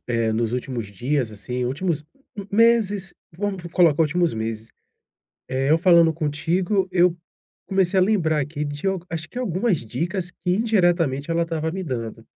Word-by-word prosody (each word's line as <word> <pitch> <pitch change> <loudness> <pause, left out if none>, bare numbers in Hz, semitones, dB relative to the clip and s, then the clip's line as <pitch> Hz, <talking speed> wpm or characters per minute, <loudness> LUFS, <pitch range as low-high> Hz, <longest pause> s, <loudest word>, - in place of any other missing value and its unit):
eh, 115 -2 +1
nos 115 +1 -1
últimos 125 -3 -3
dias, 125 +3 -1
assim, 125 +4 -4
últimos 150 +4 -2 0.5
meses, 205 -4 +3 0.2
vamos 195 -2 -3
colocar 165 -3 +4
últimos 170 +2 +1
meses, 110 0 -4 0.8
eh, 135 +1 0
eu 160 - +6
falando 170 -2 +5
contigo, 175 +6 0
eu 180 -1 +3 0.5
comecei 190 -1 +2
a - - +5
lembrar 170 -7 +2
aqui 150 +1 -4
de 145 +6 -4
al 190 -2 0
acho 160 -1 -5
que 245 - -10
algumas 195 - 0
dicas 175 - -3
que, 180 - -3
indiretamente, 175 - +1
ela 170 0 +2
estava 160 -1 -2
me 190 +1 -4
dando. 115 -7 -5
165 Hz, 155 wpm, -23 LUFS, 135-185 Hz, 0.8 s, eu